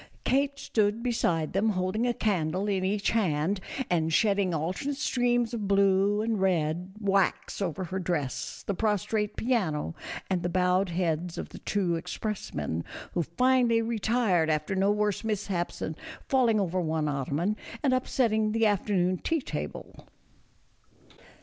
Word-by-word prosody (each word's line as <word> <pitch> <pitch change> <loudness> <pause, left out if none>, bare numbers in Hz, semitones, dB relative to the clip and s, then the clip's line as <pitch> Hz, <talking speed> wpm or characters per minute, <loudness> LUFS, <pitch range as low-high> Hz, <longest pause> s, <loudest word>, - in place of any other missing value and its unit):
Kate 280 +1 +2
stood 215 -3 0
beside 175 -10 0
them 200 +4 +2
holding 195 +4 0
a 240 - +2
candle 185 -2 0
in 195 -2 0
each 200 +2 +1
hand, 185 -3 +1 0.3
and 165 -2 +1
shedding 200 +1 +3
alternate 180 - -2
streams 245 -4 +1
of 215 -4 -2
blue 200 +1 +3
and 220 -3 0
red 175 0 0
wax 195 -1 +1
over 185 0 -2
her 190 +1 -3
dress, 145 -10 -3
the 200 - -1
prostrate 210 +1 0
piano, 180 - 0 0.3
and 185 -2 0
the 175 - -1
bowed 180 +1 +2
heads 170 -1 -1
of - - -5
the - - -10
two 180 -5 0
expressmen, 85 - -4 0.3
who 175 - +1
finally 240 - +3
retired 220 -6 +1
after 155 +4 0
no 195 +1 +2
worse 210 0 0
mishaps 200 -5 -2
than 160 - -4 0.3
falling 240 -5 +3
over 185 -1 0
one 160 -2 0
ottoman 145 +8 -1 0.3
and 270 -3 +3
upsetting 220 -4 +1
the 225 0 +3
afternoon 185 -3 +1
tea 325 - 0
table. 275 - -6
195 Hz, 145 wpm, -28 LUFS, 175-220 Hz, 0.3 s, shedding